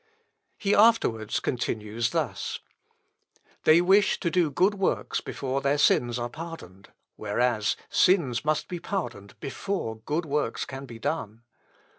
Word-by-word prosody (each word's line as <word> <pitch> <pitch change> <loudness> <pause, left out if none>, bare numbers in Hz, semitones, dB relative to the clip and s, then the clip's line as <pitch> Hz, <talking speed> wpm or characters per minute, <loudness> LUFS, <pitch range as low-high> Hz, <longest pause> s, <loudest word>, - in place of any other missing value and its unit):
He 205 -1 +1
afterwards 160 - +3
continues 115 -1 -2
thus: 150 - -2 1.1
"They 160 +2 +7
wish 195 +3 +4
to 170 - 0
do 175 -3 +2
good 185 +8 +2
works 195 -2 -1
before 135 0 -3
their 140 +1 +1
sins 120 -4 +3
are 120 0 -2
pardoned, 120 - -10 0.3
whereas 110 0 0
sins 150 -11 +3
must 155 0 0
be 175 - -5
pardoned 135 - -5
before 140 - -3
good 155 +9 -2
works 145 -5 -1
can 135 +1 -8
be 115 -2 -9
done. 115 -4 -4
140 Hz, 130 wpm, -27 LUFS, 115-175 Hz, 1.1 s, They